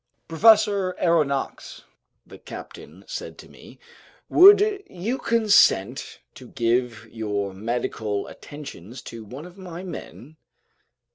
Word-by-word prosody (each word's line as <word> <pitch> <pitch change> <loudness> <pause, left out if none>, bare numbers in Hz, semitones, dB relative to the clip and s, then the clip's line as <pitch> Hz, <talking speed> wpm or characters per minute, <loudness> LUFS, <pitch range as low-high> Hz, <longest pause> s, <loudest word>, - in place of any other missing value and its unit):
"Professor 200 +1 +4
Aronnax," 150 -6 -1 0.4
the - - -14
captain - - -11
said - - -7
to - - -13
me, - - -16 0.5
"would 405 +2 +7
you 215 +9 -4
consent 205 - +2
to 130 - -13
give 120 -2 -1
your 105 -3 -3
medical 110 -1 -3
attentions 130 - -11
to 115 -1 -9
one 130 +9 -10
of 180 +2 -14
my 180 -1 -8
men?" 155 -5 -10
145 Hz, 110 wpm, -24 LUFS, -, 0.5 s, would